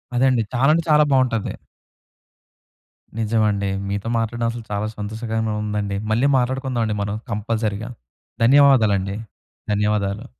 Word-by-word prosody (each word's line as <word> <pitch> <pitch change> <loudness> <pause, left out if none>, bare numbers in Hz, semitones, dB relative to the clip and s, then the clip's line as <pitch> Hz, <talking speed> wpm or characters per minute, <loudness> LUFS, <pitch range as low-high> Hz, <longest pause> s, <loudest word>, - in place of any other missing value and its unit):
అదండి. 125 -2 +3
చాలా 130 +3 +3
అంటే 165 +1 +1
చాలా 150 0 +6
బావుంటది. 125 -5 +1 1.6
నిజమండి. 105 -3 +1 0.2
మీతో 100 +2 -3
మాట్లాడడం 115 +1 -1
అసలు 115 0 -7
చాలా 105 +1 -1
సంతోషకరంగా 110 +1 -3
ఉందండి. 105 -1 -2
మళ్ళీ 120 +5 +3
మాట్లాడుకుందావండి 125 -3 -1
మనం 100 +1 -2
కంపల్సరీగా. 110 +1 -2 0.5
ధన్యవాదాలండి. 115 -7 +4 0.6
ధన్యవాదాలు. 105 +1 0
110 Hz, 105 wpm, -21 LUFS, 105-120 Hz, 1.6 s, చాలా